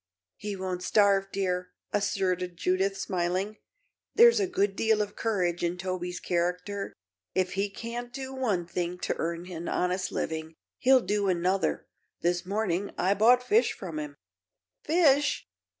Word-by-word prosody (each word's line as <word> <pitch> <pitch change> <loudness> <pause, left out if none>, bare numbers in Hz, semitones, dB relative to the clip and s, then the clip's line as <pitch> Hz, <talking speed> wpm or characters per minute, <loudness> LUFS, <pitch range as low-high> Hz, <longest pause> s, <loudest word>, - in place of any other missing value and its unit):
"He 210 -1 -4
won't 185 -1 -3
starve, 200 0 +3
dear," 180 -2 -1 0.2
asserted 185 -3 0
Judith, 190 +2 +1
smiling. 190 +2 -1 0.6
"There's 470 -1 +7
a 395 - +1
good 200 - 0
deal 220 0 +2
of 205 -1 -2
courage 180 -7 0
in 175 +1 0
Toby's 180 -1 -3
character. 180 +3 -2 0.4
If 185 -1 +1
he 200 +1 0
can't 235 +4 -6
do 265 +1 -6
one 215 -10 0
thing 175 +1 -3
to - - -1
earn 170 +1 -2
an 170 0 -5
honest 185 +1 0
living, 160 0 -3 0.2
he'll 260 0 +5
do 205 -2 0
another. 185 +1 +1 0.4
This 175 +1 0
morning 200 -2 -1
I 190 +2 +3
bought 240 +5 +5
fish 430 - +2
of 175 -5 -6
him." 150 -1 -6 0.7
"Fish!" 295 -3 +3
190 Hz, 145 wpm, -28 LUFS, 180-215 Hz, 0.7 s, There's